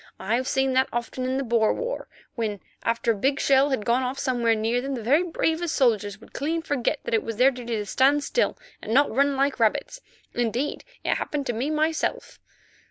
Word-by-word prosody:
I've 235 Hz, +6 st, 0 dB
seen 265 Hz, -1 st, +1 dB
that 260 Hz, +1 st, +3 dB
often 240 Hz, +2 st, -3 dB
in 260 Hz, +1 st, 0 dB
the 275 Hz, -, -1 dB
Boer 230 Hz, -3 st, +2 dB
war, -, -, -4 dB, 0.3 s
when, 215 Hz, -4 st, -3 dB, 0.2 s
after 230 Hz, 0 st, +1 dB
a -, -, 0 dB
big 270 Hz, +7 st, 0 dB
shell 275 Hz, +1 st, +4 dB
had 260 Hz, -6 st, -1 dB
gone 240 Hz, +2 st, +2 dB
off 255 Hz, +1 st, -2 dB
somewhere 245 Hz, -4 st, +1 dB
near 225 Hz, +3 st, 0 dB
them, 270 Hz, +1 st, -3 dB
the 235 Hz, -, -6 dB
very 280 Hz, +9 st, +4 dB
bravest 330 Hz, -1 st, -1 dB
soldiers 210 Hz, -6 st, +1 dB
would -, -, -17 dB
clean 320 Hz, +4 st, -2 dB
forget 285 Hz, -6 st, -1 dB
that -, -, -4 dB
it 225 Hz, -, +3 dB
was 225 Hz, -, -5 dB
their 255 Hz, +5 st, +5 dB
duty 240 Hz, -2 st, -4 dB
to 210 Hz, -1 st, -2 dB
stand 275 Hz, +7 st, +3 dB
still -, -, 0 dB, 0.2 s
and 220 Hz, -, -2 dB
not 285 Hz, +2 st, +4 dB
run 280 Hz, +1 st, +3 dB
like 275 Hz, -1 st, +1 dB
rabbits; 230 Hz, -, 0 dB, 0.3 s
indeed, 240 Hz, +4 st, -1 dB, 0.2 s
it -, -, +1 dB
happened 290 Hz, -2 st, -3 dB
to 240 Hz, -, -1 dB
me 245 Hz, +6 st, -2 dB
myself." 310 Hz, +1 st, -1 dB
255 Hz, 210 wpm, -25 LUFS, 230-280 Hz, 0.3 s, their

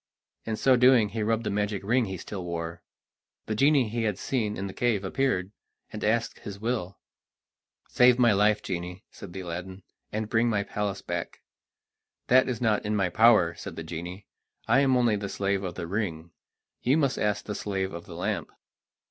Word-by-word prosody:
In 110 Hz, -, -2 dB
so 130 Hz, +4 st, +4 dB
doing 125 Hz, -3 st, +5 dB
he 110 Hz, +2 st, -4 dB
rubbed 110 Hz, +1 st, 0 dB
the 105 Hz, -, -2 dB
magic 105 Hz, -1 st, -1 dB
ring 120 Hz, +4 st, +2 dB
he 95 Hz, -2 st, -5 dB
still 95 Hz, +2 st, -6 dB
wore. 85 Hz, -1 st, -5 dB, 0.6 s
The 110 Hz, -, -2 dB
genie 135 Hz, +2 st, +4 dB
he 115 Hz, +2 st, -2 dB
had 105 Hz, -4 st, 0 dB
seen 110 Hz, -5 st, -2 dB
in 95 Hz, -, -3 dB
the 95 Hz, -, -6 dB
cave 115 Hz, -5 st, 0 dB
appeared, 95 Hz, -3 st, 0 dB, 0.4 s
and 105 Hz, -, -5 dB
asked 115 Hz, +2 st, 0 dB
his 100 Hz, -1 st, -8 dB
will. 110 Hz, -4 st, -2 dB, 0.9 s
"Save 125 Hz, 0 st, +5 dB
my 120 Hz, -3 st, +5 dB
life, 105 Hz, +1 st, +3 dB
genie," 90 Hz, +1 st, -5 dB
said 90 Hz, -3 st, -11 dB
Aladdin, 95 Hz, +1 st, -6 dB, 0.3 s
"and 110 Hz, 0 st, -2 dB
bring 115 Hz, +2 st, +2 dB
my 105 Hz, -3 st, +1 dB
palace 100 Hz, -1 st, -3 dB
back." -, -, -5 dB, 0.9 s
"That 130 Hz, +1 st, +5 dB
is 120 Hz, -3 st, -2 dB
not 110 Hz, -4 st, +1 dB
in 105 Hz, 0 st, -1 dB
my 95 Hz, -3 st, +1 dB
power," 110 Hz, -6 st, +5 dB
said -, -, -8 dB
the 80 Hz, -, -6 dB
genie; 90 Hz, +4 st, -7 dB, 0.4 s
"I 120 Hz, +4 st, +5 dB
am 135 Hz, -2 st, +4 dB
only 120 Hz, -4 st, +3 dB
the 100 Hz, -1 st, -4 dB
slave 100 Hz, 0 st, -1 dB
of 90 Hz, -2 st, -4 dB
the 90 Hz, -, -4 dB
ring; 85 Hz, -4 st, -3 dB, 0.5 s
you 130 Hz, +5 st, +3 dB
must 140 Hz, -4 st, +1 dB
ask 105 Hz, -1 st, 0 dB
the 105 Hz, -, -4 dB
slave 95 Hz, -2 st, -3 dB
of 85 Hz, 0 st, -8 dB
the -, -, -9 dB
lamp." -, -, -2 dB
105 Hz, 190 wpm, -27 LUFS, 95-115 Hz, 0.9 s, doing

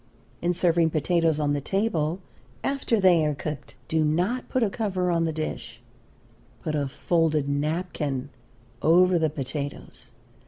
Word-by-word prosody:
In 175 Hz, +1 st, +1 dB
serving 170 Hz, -2 st, +3 dB
potatoes 160 Hz, 0 st, +1 dB
on 145 Hz, -1 st, +1 dB
the 145 Hz, -, -1 dB
table 180 Hz, -2 st, -1 dB, 0.4 s
after 270 Hz, -5 st, 0 dB
they 180 Hz, -4 st, +5 dB
are 150 Hz, -1 st, 0 dB
cooked, 150 Hz, +1 st, -6 dB
do 160 Hz, -1 st, +1 dB
not 180 Hz, +11 st, 0 dB
put 255 Hz, -, +1 dB
a 215 Hz, -, +2 dB
cover 185 Hz, -4 st, -1 dB
on 165 Hz, -1 st, +2 dB
the 160 Hz, -, 0 dB
dish; 155 Hz, 0 st, -5 dB, 0.8 s
put 155 Hz, -, -2 dB
a 145 Hz, -2 st, 0 dB
folded 155 Hz, 0 st, +1 dB
napkin 145 Hz, -2 st, -2 dB, 0.5 s
over 180 Hz, +2 st, +5 dB
the 160 Hz, -1 st, +2 dB
potatoes. 140 Hz, 0 st, -6 dB
160 Hz, 145 wpm, -26 LUFS, 150-180 Hz, 0.8 s, they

